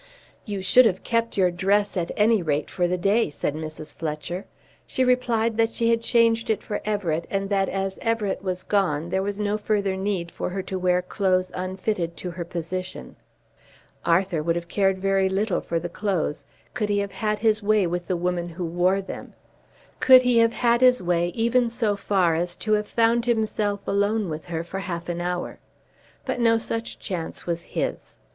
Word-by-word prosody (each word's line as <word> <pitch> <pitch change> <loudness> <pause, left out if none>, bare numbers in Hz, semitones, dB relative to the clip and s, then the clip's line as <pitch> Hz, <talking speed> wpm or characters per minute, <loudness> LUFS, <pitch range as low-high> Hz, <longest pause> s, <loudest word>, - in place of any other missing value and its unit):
"You 200 -3 -4
should 240 +6 +6
have 190 -3 -2
kept 230 -1 0
your 185 -2 +4
dress 200 +4 +1
at 175 -2 -1
any 215 0 +4
rate 150 -3 -1
for 175 -2 +1
the 180 +1 0
day," 200 +4 +2
said 145 0 -2
Mrs. 155 -1 -7
Fletcher. 160 +3 -4 0.4
She 260 - 0
replied 235 -3 +1
that 225 -1 +3
she 230 0 +1
had 230 0 +2
changed 230 -1 +2
it 220 - 0
for 205 - -4
Everett, 180 -6 -1
and 195 0 -2
that 195 -1 +2
as 195 0 -2
Everett 225 -4 -1
was 185 -2 -3
gone 175 -6 0
there 190 +1 0
was 200 +1 -3
no 210 0 0
further 205 -2 0
need 190 -3 -2
for - - -4
her 190 +1 -4
to 190 0 -4
wear 180 0 +2
clothes 185 -1 0
unfitted 185 -1 -3
to 180 - -5
her 170 0 -5
position. 175 +2 -5 0.9
Arthur 170 -1 +2
would 165 +2 0
have 170 0 -4
cared 195 +1 +1
very 195 0 +2
little 195 0 0
for 170 - -2
the 170 - -4
clothes 175 -5 -2 0.3
could 215 -4 -1
he 205 - +2
have 200 -1 -1
had 215 -2 -1
his 215 -1 +2
way 210 -1 +3
with 175 0 -3
the 185 - 0
woman 175 0 -1
who 175 +1 -5
wore 180 +3 +1
them, 190 - -8 0.7
could 255 -1 +8
he 245 -2 +4
have 230 0 +4
had 235 0 +2
his 250 -4 +5
way 175 -1 +1
even 235 +1 +2
so 230 -3 0
far 195 -4 +2
as 175 +2 -1
to 215 - -1
have 210 0 +1
found 235 +1 +2
himself 215 -3 0
alone 205 0 +1
with 155 0 -5
her 165 -2 -3
for 190 +3 -6
half 170 -3 -5
an 175 0 -2
hour. 175 0 -3 0.7
But - - -2
no 230 -1 +4
such 225 0 -4
chance 170 -4 -5
was 170 -1 -2
his. - - -4
195 Hz, 195 wpm, -24 LUFS, 175-215 Hz, 0.9 s, could